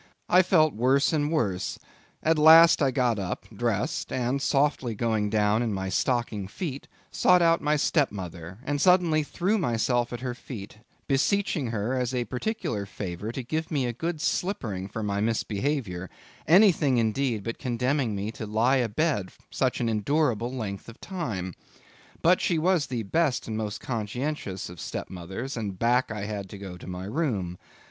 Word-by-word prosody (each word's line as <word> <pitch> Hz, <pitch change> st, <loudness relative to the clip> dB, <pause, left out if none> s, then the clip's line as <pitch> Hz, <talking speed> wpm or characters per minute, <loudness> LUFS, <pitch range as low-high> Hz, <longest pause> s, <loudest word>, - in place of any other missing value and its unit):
I 180 Hz, -, +7 dB
felt 160 Hz, -5 st, +3 dB
worse 130 Hz, +7 st, +2 dB
and 150 Hz, -1 st, +1 dB
worse—at 120 Hz, -, -2 dB
last 165 Hz, +2 st, +8 dB
I 140 Hz, -, +4 dB
got 125 Hz, -4 st, +1 dB
up, 95 Hz, -2 st, -4 dB
dressed, -, -, -1 dB
and 130 Hz, +2 st, -1 dB
softly 135 Hz, -5 st, +1 dB
going 110 Hz, -2 st, 0 dB
down 105 Hz, +1 st, +2 dB
in 115 Hz, -4 st, -1 dB
my 95 Hz, 0 st, -3 dB
stockinged 110 Hz, -3 st, -1 dB
feet, 140 Hz, -, -5 dB, 0.2 s
sought 180 Hz, -1 st, +4 dB
out 165 Hz, 0 st, +4 dB
my 150 Hz, +1 st, +2 dB
stepmother, 95 Hz, -, -1 dB
and 145 Hz, 0 st, -1 dB
suddenly 180 Hz, -4 st, +4 dB
threw 185 Hz, +8 st, 0 dB
myself 120 Hz, -, +1 dB
at 120 Hz, -1 st, -5 dB
her 125 Hz, -1 st, -3 dB
feet, 110 Hz, -4 st, -9 dB, 0.3 s
beseeching 150 Hz, -, +1 dB
her 115 Hz, +2 st, -2 dB
as 125 Hz, -1 st, -1 dB
a 120 Hz, -1 st, 0 dB
particular 125 Hz, -, -3 dB
favour 100 Hz, +2 st, -5 dB
to 130 Hz, +2 st, -5 dB
give 160 Hz, +6 st, -3 dB
me 140 Hz, -4 st, 0 dB
a 120 Hz, -, -2 dB
good 165 Hz, +6 st, -3 dB
slippering 110 Hz, -, -2 dB
for 110 Hz, +2 st, -5 dB
my 100 Hz, -1 st, -1 dB
misbehaviour; 110 Hz, -3 st, -1 dB, 0.4 s
anything 165 Hz, -, +5 dB
indeed 115 Hz, -1 st, 0 dB
but 115 Hz, +2 st, -4 dB
condemning 125 Hz, -1 st, 0 dB
me 100 Hz, +2 st, -3 dB
to 110 Hz, -1 st, -7 dB
lie 115 Hz, +6 st, +3 dB
abed 120 Hz, -, 0 dB, 0.2 s
such 130 Hz, -2 st, 0 dB
an 120 Hz, -, 0 dB
unendurable 120 Hz, +1 st, +1 dB
length 110 Hz, -5 st, -5 dB
of 115 Hz, -, -13 dB
time. 105 Hz, -, -4 dB, 0.7 s
But 180 Hz, +2 st, +5 dB
she 170 Hz, -, +1 dB
was 165 Hz, -2 st, +2 dB
the 120 Hz, -4 st, -3 dB
best 145 Hz, +5 st, 0 dB
and 110 Hz, -, -3 dB
most 110 Hz, -2 st, -3 dB
conscientious 115 Hz, -3 st, -3 dB
of 90 Hz, -1 st, -10 dB
stepmothers, 95 Hz, -, -5 dB
and 105 Hz, -5 st, -4 dB
back 120 Hz, +4 st, +2 dB
I 105 Hz, -2 st, -4 dB
had 100 Hz, -2 st, -5 dB
to 100 Hz, -, -8 dB
go 95 Hz, -2 st, -8 dB
to 90 Hz, -, -11 dB
my 90 Hz, 0 st, -5 dB
room. 105 Hz, -, -2 dB
120 Hz, 165 wpm, -27 LUFS, 105-150 Hz, 0.7 s, last